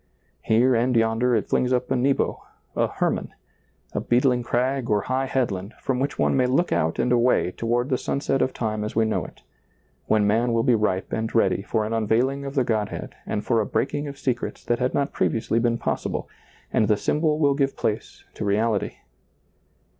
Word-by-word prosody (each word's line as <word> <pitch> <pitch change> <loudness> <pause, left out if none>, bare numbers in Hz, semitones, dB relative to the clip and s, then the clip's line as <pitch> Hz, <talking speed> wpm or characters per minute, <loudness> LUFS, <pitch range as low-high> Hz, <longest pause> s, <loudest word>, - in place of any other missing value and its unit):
Here 120 +4 +3
and 125 +2 +2
yonder 115 +2 +2
it 105 - 0
flings 125 - +1
up 125 0 0
a - - +3
Nebo, 135 +2 +1 0.3
a - - +2
Hermon - - -2 0.3
— - - -37
a - - -1
beetling 125 0 +2
crag 125 +2 -1
or 105 -1 +2
high 130 +4 -1
headland, 105 -6 -2
from 130 -2 -1
which 140 +2 -2
one - - +2
may 130 -1 +3
look 140 +8 +1
out 80 -1 +1
and 125 - +1
away 120 -6 +3
toward 120 +5 -1
the 130 - +1
sunset 135 -1 -1
of 130 - +1
time 110 -3 -2
as 105 - -5
we 115 0 +3
know 110 - 0
it; - - -14 0.6
when 105 -1 +3
man 115 +3 +2
will 115 0 +2
be 125 - +4
ripe 105 -4 0
and 110 +1 -2
ready 100 -4 +3
for 110 +2 -1
an 110 - -3
unveiling 120 +5 +1
of 140 +1 -6
the 130 - +3
Godhead 110 -3 -2
and 105 - -2
for 115 -3 +2
a - - -1
breaking 145 +3 -1
of 140 -1 -7
secrets 125 -4 -3
that 120 - 0
had 125 0 0
not 140 0 0
previously 115 0 0
been 120 0 +1
possible, 120 - -3 0.5
and 110 - +3
the 105 - +3
symbol 150 +7 +1
will 145 -2 +3
give* 135 -1 0
place 110 +1 -3
to - - -5
reality. 105 +1 0
120 Hz, 200 wpm, -24 LUFS, 110-130 Hz, 0.6 s, be